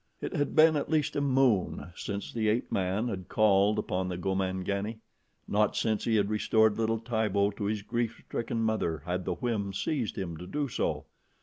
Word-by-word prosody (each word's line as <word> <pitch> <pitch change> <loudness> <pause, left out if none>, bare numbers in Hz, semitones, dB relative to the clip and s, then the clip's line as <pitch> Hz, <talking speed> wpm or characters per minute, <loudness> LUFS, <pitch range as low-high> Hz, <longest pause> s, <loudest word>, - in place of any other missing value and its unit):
It - - -4
had 145 - -1
been 160 0 +7
at 145 - -2
least 155 -2 +1
a 145 - +1
moon 130 -10 +2
since 100 0 -5
the 110 -2 +1
ape 115 +3 0
man 95 +5 0
had 95 -6 -5
called 105 -1 +4
upon 90 0 -1
the 90 - -3
Gomangani. 95 +3 -1 0.5
Not 105 0 +2
since 110 -2 0
he 115 - +2
had 100 -2 +3
restored 110 0 +3
little 115 0 +1
Tibo 110 -3 +1
to 100 0 -5
his 105 0 -1
grief 115 0 -2
stricken 115 0 -2
mother 85 -9 -1
had 90 +1 -2
the - - -1
whim 110 -6 -2
seized 120 +3 -2
him 85 -4 -4
to 90 - -8
do 145 +4 -1
so. 125 - -2
105 Hz, 190 wpm, -29 LUFS, 95-115 Hz, 0.5 s, been